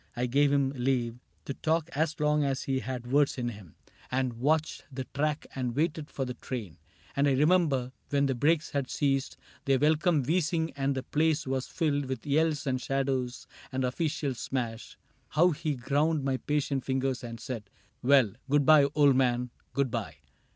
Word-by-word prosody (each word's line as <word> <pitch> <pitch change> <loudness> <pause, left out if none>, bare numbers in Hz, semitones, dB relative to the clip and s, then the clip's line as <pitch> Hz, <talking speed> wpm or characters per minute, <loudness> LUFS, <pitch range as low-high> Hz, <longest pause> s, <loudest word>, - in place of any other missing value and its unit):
I 120 +1 0
gave 140 +3 +3
him 140 -1 +2
leave 120 -2 0 0.3
To 140 - -3
talk 160 +3 0
as 155 +1 0
long 150 0 +2
as 135 -2 -1
he 135 -1 0
had 125 0 -5
words 145 0 +3
in 120 -1 -1
him. 100 -7 -11
CAPTAIN - - -39
CRAIG - - -27
17 130 - 0
And 130 -2 -1
watched 155 +3 +1
the 130 0 -4
track 150 +1 -1
and 125 -3 -3
waited 155 0 -1
for 135 - -3
the 125 - -4
train; 115 -9 -6 0.4
And 140 +1 +3
I 140 - +3
remember, 150 -4 +3 0.2
when 140 0 +2
the 135 - +1
brakes 150 +5 +1
had 140 -3 -2
ceased 135 -2 0 0.3
Their 135 -1 +3
welcome 150 +1 +3
wheezing 160 +2 0
and 140 0 0
the 130 - -3
place 155 +1 +1
was 130 -1 -2
filled 145 -4 0
With 130 0 -5
yells 150 0 +1
and 130 -2 -1
shadows 135 -2 -1 0.3
and 130 0 -1
official 140 +1 -1
smash, 120 -2 -4 0.3
How 175 +4 +4
he 155 -1 -2
ground 145 +4 +1
my 135 -1 0
patient 140 -2 -1
fingers 130 -1 -1
and 115 -1 -7
said, 110 -6 -6 0.2
" - - -40
Well, 130 -5 +4 0.2
Good 145 0 +3
by, 155 -2 +7
old 145 -3 +5
man! 125 -1 +1
— - - -41
good 140 -3 +1
by 105 - -3
135 Hz, 195 wpm, -29 LUFS, 125-150 Hz, 0.4 s, by